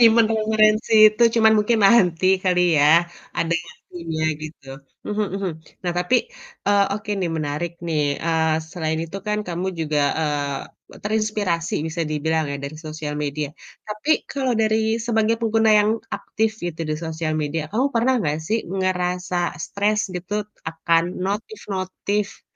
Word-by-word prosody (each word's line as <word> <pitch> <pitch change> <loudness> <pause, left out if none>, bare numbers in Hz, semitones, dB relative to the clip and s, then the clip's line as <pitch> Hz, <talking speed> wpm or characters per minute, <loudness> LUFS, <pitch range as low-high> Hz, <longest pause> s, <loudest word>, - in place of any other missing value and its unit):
nyimpen 230 -1 +6
referensi 215 0 +2 0.2
itu, 215 - 0 0.2
cuman 220 0 +6
mungkin 220 +2 +2
nanti 185 -5 +5 0.2
kali 180 -1 +3 0.2
ya 160 +4 +6 0.3
ada 170 0 0 0.2
waktunya 165 -2 -6 0.2
gitu. 155 -3 -9 0.4
Mhm 210 0 0
mhm. 195 -2 -2 0.3
Nah 175 - 0
tapi, 180 +8 +3 0.5
eee, 200 -1 +4
oke, 210 0 -5
nih, 175 - 0
menarik, 155 +2 -2 0.2
nih, 160 -2 0 0.2
eee, 160 -1 +2 0.2
selain 160 -3 -2
itu 165 +4 -7
kan 210 0 0
kamu 175 +2 -2
juga, 150 -2 0 0.2
eee, 145 -2 -1 0.4
terinspirasi 210 -5 -1
bisa 165 +1 -4
dibilang 160 +1 0
ya - - -2
dari 140 +2 -6
sosial 155 -1 -5
media, 145 0 -3 0.3
tapi 215 +8 -4 0.2
kalau 265 -3 0
dari 220 0 +2
sebagai 225 -1 +2
pengguna 225 -1 +2
yang 210 +1 +2 0.3
aktif 220 0 -1
gitu 170 -2 -4
di 155 - -1
sosial 160 -1 -3
media 155 0 -2
kamu 255 - 0
pernah 245 +2 +2
nggak 155 -8 0
sih 225 - +2
ngerasa 180 -1 -1 0.3
stres 210 +1 0
gitu 205 +4 -4 0.2
akan 165 +1 +1 0.2
notif-notif 200 - -3
185 Hz, 145 wpm, -22 LUFS, 160-215 Hz, 0.5 s, nyimpen